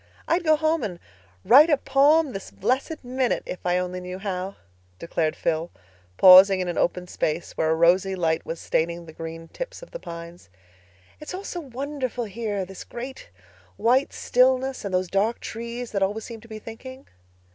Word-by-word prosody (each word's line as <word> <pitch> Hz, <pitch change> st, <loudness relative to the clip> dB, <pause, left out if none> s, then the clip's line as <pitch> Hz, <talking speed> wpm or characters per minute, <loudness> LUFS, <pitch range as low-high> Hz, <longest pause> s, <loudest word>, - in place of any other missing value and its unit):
"I'd 345 Hz, +2 st, +1 dB
go 310 Hz, -1 st, +5 dB
home 315 Hz, +1 st, +1 dB
and 185 Hz, -7 st, -4 dB, 0.5 s
write 290 Hz, +7 st, +8 dB
a 295 Hz, -, +4 dB
poem 285 Hz, +3 st, +3 dB
this 195 Hz, -, -7 dB
blessed 265 Hz, -, -2 dB
minute 250 Hz, 0 st, -1 dB
if 180 Hz, -, -7 dB
I 180 Hz, 0 st, +1 dB
only 180 Hz, 0 st, -3 dB
knew 180 Hz, 0 st, -6 dB
how," 190 Hz, -1 st, -4 dB, 0.4 s
declared 160 Hz, -, -1 dB
Phil, 165 Hz, +1 st, -1 dB, 0.5 s
pausing 190 Hz, +1 st, +9 dB
in 185 Hz, -, -2 dB
an 175 Hz, -, -2 dB
open 180 Hz, +1 st, 0 dB
space 160 Hz, -1 st, -2 dB
where 160 Hz, -, 0 dB
a 160 Hz, -, +3 dB
rosy 180 Hz, +4 st, +3 dB
light 165 Hz, -3 st, 0 dB
was 165 Hz, -, -5 dB
staining 170 Hz, +1 st, -1 dB
the 160 Hz, -, -12 dB
green 165 Hz, +1 st, -8 dB
tips -, -, -7 dB
of -, -, -13 dB
the -, -, -7 dB
pines. 170 Hz, -, -10 dB, 0.7 s
"It's 305 Hz, +4 st, -7 dB
all 385 Hz, -, -6 dB
so 355 Hz, -, -5 dB
wonderful 265 Hz, -3 st, -4 dB
here—this 200 Hz, -3 st, -4 dB
great, 255 Hz, +3 st, -8 dB, 0.5 s
white 255 Hz, +4 st, +2 dB
stillness, 260 Hz, +1 st, +2 dB
and 200 Hz, -, -4 dB
those 185 Hz, 0 st, 0 dB
dark 205 Hz, +5 st, 0 dB
trees 235 Hz, +1 st, -6 dB
that 200 Hz, -, -1 dB
always 205 Hz, +3 st, 0 dB
seem 230 Hz, -2 st, -9 dB
to 230 Hz, -, -15 dB
be 220 Hz, -1 st, -8 dB
thinking." 260 Hz, +5 st, -10 dB
210 Hz, 180 wpm, -24 LUFS, 180-260 Hz, 0.7 s, pausing